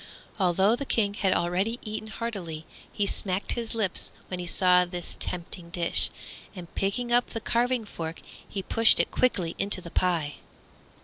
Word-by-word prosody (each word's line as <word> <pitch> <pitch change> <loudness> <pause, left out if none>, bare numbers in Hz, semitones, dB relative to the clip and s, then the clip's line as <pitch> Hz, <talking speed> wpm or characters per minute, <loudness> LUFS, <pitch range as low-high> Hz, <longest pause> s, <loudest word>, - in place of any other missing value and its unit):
Although 190 +4 +3
the 280 - -4
King 205 -3 +1
had 195 -2 +1
already 190 +7 0
eaten 215 0 -5
heartily, 195 -9 -5 0.3
he 205 - 0
smacked 190 -1 -2
his 230 -1 -3
lips 205 -5 0 0.2
when 180 - -4
he 175 - -5
saw 180 0 +5
this 175 -1 -6
tempting 170 0 -4
dish, 170 0 +2 0.5
and 175 -2 -10
picking 240 +5 -1
up 245 0 +4
the 225 - -5
carving 240 +1 +1
fork 165 -5 -6 0.3
he 195 - -4
pushed 225 +3 +6
it - - +2
quickly 185 -10 +1
into 195 -1 +2
the 170 -2 -10
pie. 165 -5 0
195 Hz, 165 wpm, -27 LUFS, 175-225 Hz, 0.5 s, pushed